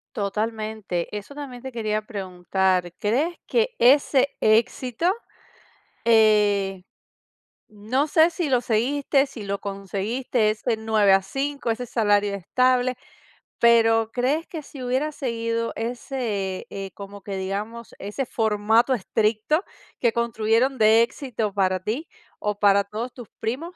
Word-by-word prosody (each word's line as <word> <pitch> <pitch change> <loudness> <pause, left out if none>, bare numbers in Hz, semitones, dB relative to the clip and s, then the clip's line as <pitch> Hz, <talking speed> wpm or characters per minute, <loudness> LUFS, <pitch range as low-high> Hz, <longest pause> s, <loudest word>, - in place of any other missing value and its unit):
Totalmente, 215 -3 -2
eso 210 +7 -7
también 270 -4 -7
te 265 - -7
quería 215 -3 -1
preguntar, 185 -3 -1
crees 275 +12 0
que 475 +1 0
ese 275 +2 +4
éxito, 230 +6 +1 1.0
eh, 210 -4 +3 0.9
no 220 +8 -1
sé, 320 +1 +5
si 335 -3 -2
lo 255 -2 +3
seguiste, 270 +5 +1
si 265 -6 -9
lo 200 0 -3
conseguiste, 205 +4 -1
eso 215 0 -3
de 230 - +3
9 220 -3 +3
a 195 - +5
5, 270 +5 -2
ese 245 +2 -3
salario 205 -3 +1
estable, 255 +6 +1 0.6
pero, 225 -1 +4
¿crees 275 +6 0
que 320 -3 -7
si 275 -2 -10
hubieras 265 +5 -1
seguido 230 -2 -2
ese, 225 -5 -3
eh, 195 -1 -6
como 200 0 -10
que 200 -1 -5
digamos, 205 +5 -5
ese 210 +7 -4
formato 220 +3 +2
estricto 220 - 0 0.4
que 235 -2 +2
construyeron 235 +3 +1
de 220 0 +6
éxito 235 -3 -2
para 190 -2 +1
ti 230 - -4 0.3
o 210 -1 -3
para 200 -1 +5
todos 220 +5 -5
tus 240 -3 -11
primos, 310 +11 -4
225 Hz, 130 wpm, -24 LUFS, 205-255 Hz, 1.0 s, de